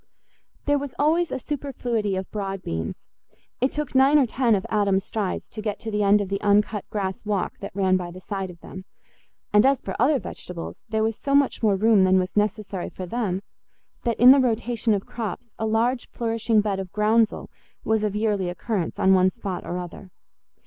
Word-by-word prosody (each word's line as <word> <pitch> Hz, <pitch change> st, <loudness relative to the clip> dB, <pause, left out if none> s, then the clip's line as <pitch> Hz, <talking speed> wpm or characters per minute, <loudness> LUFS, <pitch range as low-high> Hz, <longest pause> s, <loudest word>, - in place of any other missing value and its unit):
There 290 Hz, 0 st, +2 dB
was 280 Hz, -2 st, -6 dB
always 325 Hz, +3 st, +2 dB
a -, -, -1 dB
superfluity 245 Hz, -7 st, -2 dB
of 190 Hz, 0 st, -5 dB
broad 195 Hz, -2 st, -4 dB
beans—it 80 Hz, -, -5 dB
took 300 Hz, -2 st, -4 dB
nine 270 Hz, +3 st, +5 dB
or 280 Hz, -, +5 dB
ten 240 Hz, -1 st, +2 dB
of 190 Hz, -, -2 dB
Adam's 200 Hz, -3 st, +1 dB
strides 205 Hz, -4 st, -3 dB
to 215 Hz, -, -7 dB
get 210 Hz, -1 st, -3 dB
to 225 Hz, -, -5 dB
the 210 Hz, 0 st, 0 dB
end 205 Hz, +1 st, +4 dB
of 195 Hz, -, -4 dB
the 195 Hz, 0 st, -2 dB
uncut 205 Hz, 0 st, +2 dB
grass 195 Hz, +1 st, -3 dB
walk 205 Hz, -3 st, -2 dB
that -, -, -8 dB
ran 190 Hz, -2 st, +3 dB
by 180 Hz, -1 st, -5 dB
the 180 Hz, +1 st, -10 dB
side 195 Hz, 0 st, -4 dB
of 170 Hz, -1 st, -13 dB
them; 185 Hz, 0 st, -10 dB, 0.7 s
and 210 Hz, 0 st, +6 dB
as 270 Hz, -1 st, +4 dB
for 190 Hz, -, -6 dB
other 275 Hz, +5 st, +4 dB
vegetables, 180 Hz, -8 st, -7 dB
there 220 Hz, 0 st, 0 dB
was 220 Hz, 0 st, -1 dB
so 275 Hz, 0 st, 0 dB
much 280 Hz, -1 st, +2 dB
more 210 Hz, -3 st, +3 dB
room 215 Hz, 0 st, +4 dB
than 185 Hz, 0 st, +4 dB
was 185 Hz, 0 st, -1 dB
necessary 210 Hz, -2 st, -1 dB
for 185 Hz, -, -7 dB
them 195 Hz, -2 st, -2 dB, 0.6 s
that 235 Hz, -3 st, -1 dB
in 245 Hz, +2 st, +9 dB
the 275 Hz, -, +7 dB
rotation 230 Hz, -2 st, +1 dB
of 195 Hz, -, -4 dB
crops 230 Hz, 0 st, -6 dB
a 220 Hz, -, 0 dB
large 235 Hz, +3 st, 0 dB
flourishing 225 Hz, -1 st, +1 dB
bed 200 Hz, -2 st, -1 dB
of 190 Hz, -2 st, -6 dB
groundsel 215 Hz, +1 st, +1 dB, 0.3 s
was 220 Hz, -1 st, +1 dB
of 210 Hz, -1 st, -1 dB
yearly 210 Hz, -4 st, 0 dB
occurrence 180 Hz, -1 st, -3 dB
on 190 Hz, -, +4 dB
one 185 Hz, 0 st, +5 dB
spot 195 Hz, -3 st, -5 dB
or 175 Hz, -, -4 dB
other. 180 Hz, +1 st, -8 dB
210 Hz, 200 wpm, -24 LUFS, 190-235 Hz, 0.7 s, in